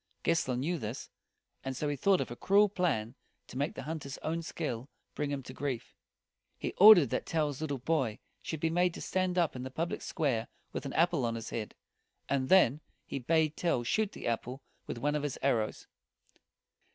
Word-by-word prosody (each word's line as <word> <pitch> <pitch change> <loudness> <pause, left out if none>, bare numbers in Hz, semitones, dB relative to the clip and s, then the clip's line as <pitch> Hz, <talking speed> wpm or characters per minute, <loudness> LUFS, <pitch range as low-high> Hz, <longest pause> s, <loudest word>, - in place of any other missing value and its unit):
Gessler 130 -7 +1
knew 165 +6 -1
this, 110 +2 -6 0.5
and 130 -1 -4
so 150 - -1
he 145 - 0
thought 190 +7 +3
of - - -4
a - - -5
cruel 200 +8 +4
plan 145 - 0 0.3
to - - -12
make 140 +4 -1
the - - -6
hunter's 150 -4 -5
own 165 +1 -1
skill 140 -6 -4 0.2
bring 150 -1 -2
him 140 -2 -3
to 130 - -9
grief. 130 -4 -4 0.6
He - - -4
ordered 190 - +9
that - - -1
Tell's 150 -3 -1
little 145 -3 -2
boy 130 -5 0 0.2
should 160 - -4
be 165 - +1
made 175 0 +2
to - - -7
stand 185 -1 0
up 170 -6 +2
in 125 - -5
the 130 - -5
public 165 +6 -3
square 125 -7 -1 0.3
with - - -4
an 135 - -6
apple 170 -4 +2
on 115 -1 0
his 115 - -6
head; 110 -2 -4 0.5
and 130 -2 0
then 155 -7 +5 0.2
he - - -4
bade 155 +3 +2
Tell 165 -9 0
shoot 215 - +1
the - - -8
apple 125 +3 -2 0.2
with - - -4
one 145 +5 0
of 150 - 0
his 145 -2 -3
arrows. 115 -6 0
145 Hz, 200 wpm, -31 LUFS, 125-165 Hz, 0.6 s, ordered